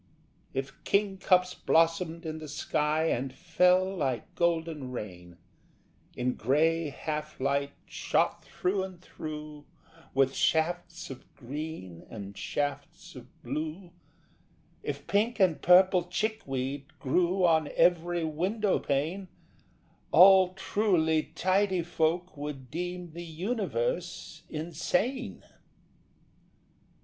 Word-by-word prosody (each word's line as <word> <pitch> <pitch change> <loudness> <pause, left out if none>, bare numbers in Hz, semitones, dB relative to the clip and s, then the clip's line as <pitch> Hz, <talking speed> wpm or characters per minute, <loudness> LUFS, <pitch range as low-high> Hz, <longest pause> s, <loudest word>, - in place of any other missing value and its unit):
If 135 +1 -5
kingcups 190 -2 +2
blossomed 165 +1 +1
in 160 0 -4
the 155 - -8
sky 150 +1 0
And 130 +2 -1
fell 180 +4 +2
like 135 -6 -2
golden 165 -5 0
rain 90 -7 -7 0.8
In 125 +1 0
grey 160 +5 +2
half 150 +1 -5
light 140 +1 0
shot - - 0
through 190 +2 -1
and 190 -2 -6
through 150 -3 -8 0.5
With 135 0 +3
shafts 170 0 0
of 130 - -11
green 130 - -7
and 100 -2 -8
shafts 145 +5 -4
of - - -10 0.2
blue, 160 +4 -4 0.9
If - - -5
pink 220 +4 +1
and 185 -5 +3
purple 180 0 +6
chickweed 145 - -3
grew 180 +6 +2
On 160 -3 +3
every 175 0 +3
window 185 +7 0
pane, 160 +8 -1 0.8
All 185 +1 +7
truly 180 -6 +1
tidy 185 -1 +2
folk 175 +2 0
would 140 -4 -6
deem 175 +1 -4
The 170 - -7
universe 220 - -3
insane. 175 - -2
165 Hz, 100 wpm, -29 LUFS, 145-180 Hz, 0.9 s, All